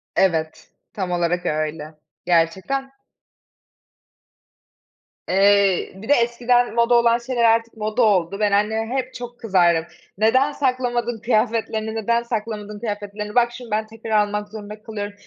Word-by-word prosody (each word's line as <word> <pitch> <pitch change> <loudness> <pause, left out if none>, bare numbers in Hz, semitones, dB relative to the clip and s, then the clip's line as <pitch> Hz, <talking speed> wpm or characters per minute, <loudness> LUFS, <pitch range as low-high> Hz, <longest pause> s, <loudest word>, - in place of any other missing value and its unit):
Evet, 160 -4 0 0.2
tam 185 -3 -3
olarak 175 0 0
öyle 155 0 -3 0.3
gerçekten. 190 +11 0 2.4
Eee, 195 0 +3
bir 220 +7 -11
de - - +7
eskiden 240 -1 +2
moda 235 +1 +3
olan 235 0 +4
şeyler 240 0 -2
artık 230 0 +2
moda 215 +3 -1
oldu. 195 -3 +2
Ben 210 -1 +2
anneme 220 +4 0
hep 255 -1 -2
çok 245 0 -8
kızardım. 175 -6 +2 0.3
Neden 260 +7 +3
saklamadın 245 -4 -1
kıyafetlerini 220 -1 0
neden 235 +2 0
saklamadın 210 -2 -5
kıyafetlerini! 210 -1 -5
Bak, 240 -1 +4
şimdi 240 -2 -10
ben 215 +1 0
tekrar 225 0 -9 0.2
almak 210 0 -4
zorunda 210 0 -9
kalıyorum. 205 -2 -5
220 Hz, 130 wpm, -21 LUFS, 200-235 Hz, 2.4 s, de